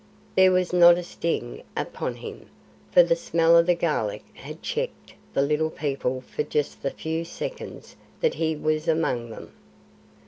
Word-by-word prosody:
There 190 0 +6
was 185 -1 +1
not 175 -1 +8
a 175 - -3
sting 110 - -3 0.2
upon - - -3
him, - - -10 0.4
for 175 - +8
the 170 0 +2
smell 165 0 +3
of 170 0 +5
the 175 - +4
garlic 150 -11 -1
had - - -10
checked - - -4 0.2
the 140 - +3
Little 150 +2 +1
People 135 -4 -2
for 130 - -4
just 150 0 -2
the 140 - 0
few 160 +3 -3
seconds - - -7 0.2
that 480 -2 +2
he 160 -1 -1
was 155 +1 -1
among 140 -8 0
them. 110 - -10
165 Hz, 165 wpm, -25 LUFS, 150-175 Hz, 0.4 s, not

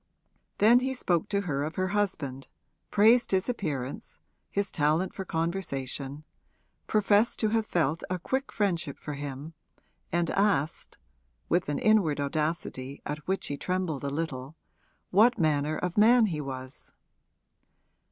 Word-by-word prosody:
Then 230 +4 +6
he 265 +1 -2
spoke 175 -9 0
to 200 -1 +1
her 145 -7 -2
of 155 +2 -4
her 185 0 0
husband, 155 -10 -2 0.4
praised 225 +4 +5
his 190 -1 +1
appearance, 150 - -4 0.3
his 200 -1 -1
talent 155 +5 +1
for 190 - -5
conversation, 150 -5 -3 0.6
professed 210 +1 +3
to 215 - +2
have 220 0 0
felt 160 -2 0
a 185 - -1
quick 265 +9 -2
friendship 170 -9 -1
for 150 - -6
him 145 +2 -6 0.6
and 170 0 +1
asked 180 -7 0 0.5
(with 175 -2 +1
an 145 - 0
inward 195 -10 +3
audacity 145 -2 -3
at 150 +1 -5
which 190 +1 -1
he 145 - -3
trembled 180 -5 -2
a 140 - -1
little) 140 -2 -4 0.6
what 230 +6 +5
manner 155 -3 +1
of 180 +2 -1
man 230 +2 +6
he 160 -7 -2
was. 130 -2 -8
165 Hz, 140 wpm, -28 LUFS, 145-200 Hz, 0.6 s, Then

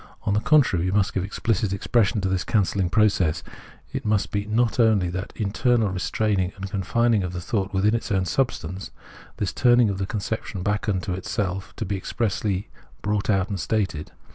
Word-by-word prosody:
On 100 - 0
the 105 - +3
contrary, 115 - +3
we 95 - 0
must 100 -1 +1
give 95 - -1
explicit 105 0 -1
expression 100 +1 +1
to 95 - 0
this 95 -1 0
cancelling 100 -3 +1
process; 95 -5 +2 0.5
it - - -3
must 105 -2 0
be 100 0 -2
not 115 +2 +1
only 110 -6 +4
that 90 +2 -4
internal 110 +1 +1
restraining 95 0 0
and 95 0 -6
con 100 -2 -1
fining 115 +3 +2
of 90 -1 -4
thought 95 +3 -2
within 100 +2 +2
its 115 -1 -2
own 95 -2 +2
substance; 95 -6 -2 0.5
this 100 - -2
turning 120 -4 +4
of 95 - -4
the 95 - -2
conception 105 -2 -4
back 105 +2 -1
into 95 -2 -1
itself 95 +1 -2
has - - -21
to 110 - -4
be 100 +1 -2
expressly 100 -1 -2 0.4
brought 105 +1 -1
out 95 0 +2
and 100 -2 -3
stated. 95 -5 -1
100 Hz, 190 wpm, -24 LUFS, 95-110 Hz, 0.5 s, only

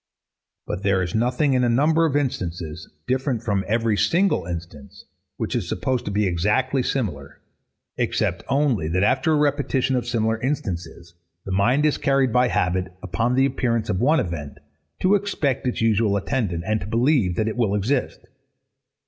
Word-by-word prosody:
But - - -4
there 95 -2 +2
is 90 - -4
nothing 125 +5 +1
in 125 -1 +2
a 120 - +2
number 155 +7 +3
of 145 - -2
instances, 85 - -3 0.2
different 130 -2 -1
from 100 -4 0
every 115 0 +1
single 180 - +1
instance, 85 -5 -8 0.3
which - - -3
is - - -2
supposed 125 +7 -1
to - - -3
be 105 +1 +1
exactly 105 +10 +1
similar; 90 - -3 0.6
except - - 0
only, 135 - +1
that 90 +4 +1
after 160 +9 +2
a - - +4
repetition 140 -3 +1
of 125 -1 -2
similar 110 -2 0
instances, 85 - -4 0.3
the 95 - -5
mind 120 +10 +2
is 150 - +1
carried 135 -3 +2
by 125 0 +4
habit, 90 -4 0
upon 115 +6 0
the 135 +1 +4
appearance 120 -4 -1
of 90 - 0
one 155 +6 +4
event, 75 -6 -4 0.4
to 185 +2 +3
expect 175 -11 0
its 125 - -2
usual 110 -2 +2
attendant, 100 -6 -2
and 110 0 0
to 95 - -6
believe 115 - +2
that 110 +4 0
it 110 - -2
will 110 -5 +1
exist. 125 +7 -1
115 Hz, 170 wpm, -23 LUFS, 95-135 Hz, 0.6 s, a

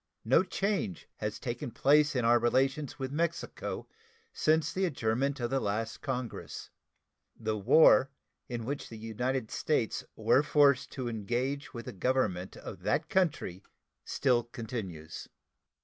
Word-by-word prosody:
No 130 +9 +5
change 190 - -2
has 105 0 -3
taken 120 +4 -4
place 145 +4 +4
in 125 -2 +1
our 120 +1 +5
relations 135 +4 +1
with 130 -1 -4
Mexico 170 +3 -3 0.5
since 160 - +2
the 190 +1 +1
adjournment 135 -2 0
of 120 0 -2
the 135 - +2
last 110 +1 -2
Congress. 125 -4 -5 0.7
The 110 -1 -1
war 130 +5 +6 0.4
in 120 -2 -4
which 140 +3 -4
the 115 - -8
United 115 +2 -2
States 135 -8 0
were 135 - +4
forced 145 -3 +4
to 130 -3 -4
engage 120 +6 -2
with 115 0 -6
the 125 - -6
Government 95 -4 0
of - - -9
that - - 0
country 150 - 0 0.4
still 125 -4 +2
continues. 105 - -6
125 Hz, 135 wpm, -31 LUFS, 110-140 Hz, 0.7 s, war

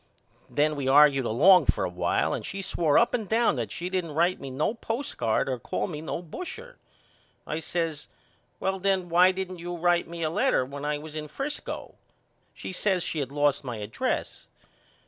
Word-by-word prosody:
Then 150 +1 +1
we 140 -2 -3
argued 140 -1 +6
along 175 - +6
for - - +2
a - - +1
while 90 0 0
and - - -3
she 195 0 -5
swore 170 -5 +2
up 235 - +4
and 220 -5 -2
down 230 -3 +3
that 115 -4 -2
she 175 - -4
didn't 180 -5 -2
write 175 +3 +2
me 135 - -6
no 140 +10 0
postcard 225 - -1
or 130 -2 -2
call - - -2
me 155 -5 -6
no 165 +2 -4
busher. 385 - -8 0.7
I 155 - -3
says 165 -2 -3 0.5
Well 190 0 -1
then 190 -2 0
why 180 +2 +6
didn't 185 -1 -5
you 175 +1 -5
write 175 0 +2
me 170 0 -5
a 155 - 0
letter 130 - +2
when 140 +2 -7
I 150 0 0
was 155 +1 -10
in 155 -1 -4
Frisco? 275 - -5 0.6
She - - -7
says 185 -1 0
she 160 - -2
had 135 -2 -3
lost 145 0 +1
my 120 -4 -5
address. 105 +1 -3
165 Hz, 190 wpm, -27 LUFS, 145-185 Hz, 0.7 s, argued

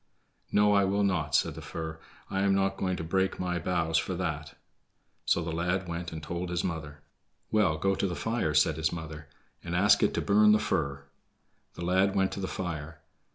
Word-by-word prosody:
"No, 105 0 +4
I 100 -1 +4
will 100 +1 +1
not," 85 -6 0
said - - +2
the - - -9
fir; 80 -1 -6 0.3
"I 95 - -1
am 100 0 +3
not 95 0 +1
going 95 -1 -1
to - - -4
break 95 +3 0
my 90 -1 -1
boughs 80 -1 +1
for 95 - -3
that." 80 -4 -4 0.7
So 85 - +2
the 80 - -3
lad 90 +3 -1
went 85 0 -4
and 80 -1 -7
told 85 +3 -4
his 90 0 -1
mother. 75 -4 -5 0.5
"Well, 100 -8 +3
go 95 +5 +1
to 100 - 0
the 90 - -3
fire," 115 -9 -1
said 80 -1 +3
his 80 0 0
mother, 80 -3 -7 0.4
"and 85 0 -4
ask 100 +3 +5
it - - +2
to - - 0
burn 105 +1 +5
the - - +5
fir." 70 -7 -1 0.7
The 85 - -5
lad 95 +2 +2
went 95 -1 +2
to - - -5
the 95 - -2
fire. 85 -4 -5
90 Hz, 205 wpm, -29 LUFS, 80-95 Hz, 0.7 s, ask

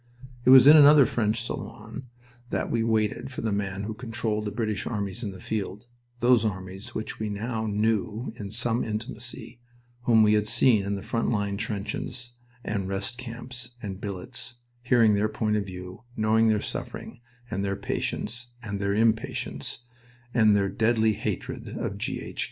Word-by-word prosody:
It - - +5
was 130 -1 +10
in 150 +2 +10
another 145 -2 +9
French 110 -1 0
salon 115 +2 -6 0.4
that - - -2
we 115 - +1
waited 110 +3 0
for 130 - -5
the 110 - -1
man 100 -1 -2
who 110 +1 -3
controlled 110 -2 -2
the 105 - -2
British 110 -2 -2
armies 105 0 -3
in 110 - -3
the 95 - -10
field 105 +2 -4 0.4
those 120 -1 +5
armies 95 -1 -4
which 110 - -4
we 110 -1 -2
now 110 +2 -2
knew 110 +2 0
in 105 -4 -6
some 115 +2 +1
intimacy, 115 +1 -5 0.5
whom 110 -2 +6
we 105 0 +5
had 105 0 +2
seen 115 -1 +4
in 100 +1 -1
the 100 - -6
front 115 0 -1
line 100 -3 0
trenches 115 +3 -4 0.3
and 100 -3 -2
rest 100 +5 -2
camps 125 0 -7
and 100 -3 -6
billets, 115 +4 -5 0.3
hearing 120 -3 +4
their 105 +1 +2
point 110 0 0
of 100 -2 -1
view, 90 +2 -8
knowing 110 +1 +3
their 105 -1 +3
suffering - - -6 0.3
and 100 - -1
their 100 0 -1
patience, 120 +4 -3
and 100 -2 -4
their 100 0 0
impatience 115 +2 0 0.5
and 110 -3 +5
their 100 -1 +2
deadly 110 +1 +2
hatred 105 -2 -4
of - - -3
G. - - -2
H. - - -8
110 Hz, 170 wpm, -27 LUFS, 100-115 Hz, 0.5 s, was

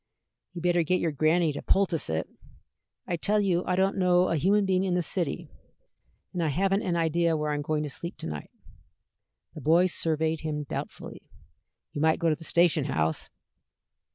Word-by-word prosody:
"Ye'd 175 -1 -7
better 175 -1 +3
get 180 +3 +1
yer 165 - 0
granny 155 +2 +2
to - - -5
poultice 185 - +1
it." 80 0 -1 0.8
"I 175 - -2
tell 210 +6 +1
you 185 -3 +1
I 180 - +1
don't 190 +2 +1
know 180 0 +3
a 170 - +1
human 195 +6 +2
being 190 -1 +1
in 185 -2 0
this 175 -2 0
city, 180 +1 -3 0.9
and 180 - -2
I 165 - +1
haven't 195 +6 +1
an 175 - -1
idea 165 0 +1
where 150 0 -1
I - - 0
am 145 - -2
going 150 +1 -1
to 150 - -4
sleep 170 +5 -6
to - - -7
night." 75 -2 -6 1.0
The 155 - -9
boy 165 +5 +4
surveyed 160 -2 0
him 150 -2 -3
doubtfully. 140 - -7 0.6
"You 145 - -3
might 160 0 +3
go 170 -1 +1
to 155 - +2
the 165 - -13
station 170 -3 +2
house." 80 - -1
170 Hz, 190 wpm, -27 LUFS, 155-180 Hz, 1.0 s, boy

